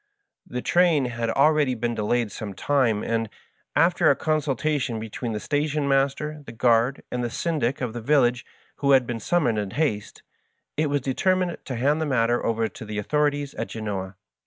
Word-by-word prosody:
The 125 0 -5
train 170 -6 +3
had 120 -1 -2
al 140 +6 +4
ready 145 -5 +1
been 120 +1 -2
delayed 115 0 0
some 105 -4 -6
time, 125 -6 +1
and, 115 -1 -1 0.5
after - - +4
a - - +5
consultation 145 -4 -1
between 115 +1 -5
the 105 - -2
station 145 +2 -1
master, 140 +2 0
the 125 - -9
guard, 120 +2 +2
and 125 0 -2
the 120 - -1
syndic 140 -2 -1
of 125 -3 -2
the 120 - -5
village, 125 -1 +2 0.3
who 140 -1 +3
had 130 -2 +5
been 120 -1 -4
summoned 120 -4 +1
in 100 -2 -3
haste, 105 -5 -2 0.5
it 155 0 +1
was 145 0 0
determined 180 +7 0
to 130 - -4
hand 145 +6 +1
the 160 - 0
matter 120 -3 +1
over 115 0 0
to 110 - -10
the 105 -1 -6
authorities 145 +4 0
at - - -4
Genoa. 100 -4 -5
125 Hz, 185 wpm, -24 LUFS, 115-145 Hz, 0.5 s, a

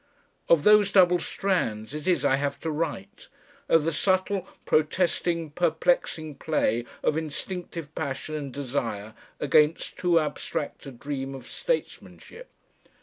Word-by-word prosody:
Of 165 -3 +5
those 210 -1 +6
double 180 -2 +5
strands 125 - -1
it 150 +2 -6
is 180 - +2
I 135 - +4
have 140 0 -2
to 160 - -2
write, 165 +7 -4 0.4
of 165 -2 +5
the 165 - 0
subtle 190 +3 +1 0.2
protesting 165 0 +1
perplexing 160 -2 0
play 120 -7 0 0.2
of 155 - +2
instinctive 165 0 -6
passion 155 0 -4
and 145 -3 -4
desire 120 -6 -3 0.3
against 150 +2 +2
too 175 -2 +4
abstract 150 -1 -4
a - - -6
dream 135 +1 -5
of 130 -2 -10
statesmanship. - - -4
155 Hz, 130 wpm, -26 LUFS, 140-180 Hz, 0.4 s, those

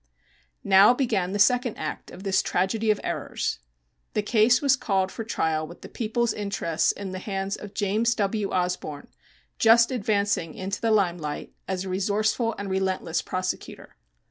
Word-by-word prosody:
Now 200 +5 +6
began 215 -9 0
the 205 - -1
second 245 +2 +3
act - - -5
of 190 - -11
this 195 -2 +2
tragedy 215 +4 0
of 210 - +3
errors. - - -3 0.6
The 210 - +1
case 225 +3 +4
was 280 -2 +4
called 190 -6 0
for 225 - -5
trial 160 -7 -1
with 175 - -13
the - - -10
People's 235 +1 -1
interests 175 -6 0
in 200 -2 -7
the 185 - -5
hands 195 0 -3
of 205 -1 -10
James 220 +3 +1
W. 205 0 -1
Osborne, 180 -5 -2 0.5
just 230 +2 +6
advancing 200 -7 0
into 190 +1 -4
the 230 - +1
limelight 175 -8 0
as 190 0 -2
a - - -5
resourceful 215 +4 0
and 200 0 -5
relentless 190 -3 -1
prosecutor. 185 0 -5
200 Hz, 160 wpm, -25 LUFS, 185-220 Hz, 0.6 s, Now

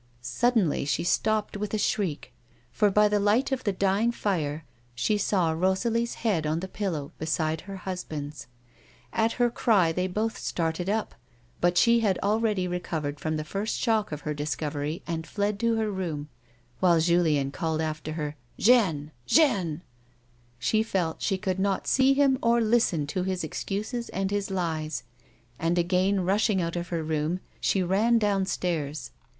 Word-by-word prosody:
Suddenly 205 - +1
she 145 - 0
stopped 215 +4 +1
with 205 +1 -3
a - - +1
shriek, 180 - -1 0.4
for 210 -1 +3
by 210 +2 +4
the 210 0 +1
light 210 +7 +2
of 265 -1 -1
the 205 - +2
dying 195 +4 +1
fire 160 -9 -2 0.3
she 125 - +1
saw 190 -5 +1
Rosalie's 205 +8 0
head 170 -9 +1
on 155 +2 0
the 190 - -5
pillow 180 -8 -3
beside 160 0 -1
her 195 0 -8
husband's. 155 -8 -6 0.7
At 225 +1 +2
her 240 -1 +2
cry 195 -9 +3
they 180 +3 -1
both 215 +4 -2
started 165 +2 -2
up, 215 +1 -1 0.5
but 175 0 +2
she 235 +2 +5
had 205 -5 +2
already 210 -2 +1
recovered 160 -5 -3
from 155 +2 -2
the 155 - -3
first 200 +8 -3
shock 220 -5 +1
of 150 -1 -5
her 150 - -3
discovery, 150 +1 -3
and 160 -1 -4
fled 205 0 -1
to 230 0 +2
her 220 -1 0
room, 160 -6 -4 0.5
while 175 -3 +4
Julien 160 -5 +2
called 160 0 -2
after 155 -1 -3
her, 150 -2 -4
" - - -35
Jeanne! 185 -11 +3 0.2
Jeanne! 190 - +3 0.4
" 120 - -37 0.3
She 215 - +1
felt 185 -7 -1
she 195 - +1
could 190 -1 -2
not 195 0 0
see 265 +1 +4
him 275 -2 +3
or 235 +1 +3
listen 220 -9 +2
to 145 +6 -2
his 185 -1 -2
excuses 215 - -3
and 195 +1 -2
his 205 -1 -1
lies, 160 -7 -2 0.6
and 165 +2 +1
again 185 +3 +2
rushing 200 +1 +2
out 170 -1 -2
of 175 0 -3
her 170 -2 -2
room 155 +3 -1 0.2
she 190 - +1
ran 210 +6 +3
downstairs. 180 -7 -1
185 Hz, 165 wpm, -27 LUFS, 160-210 Hz, 0.7 s, she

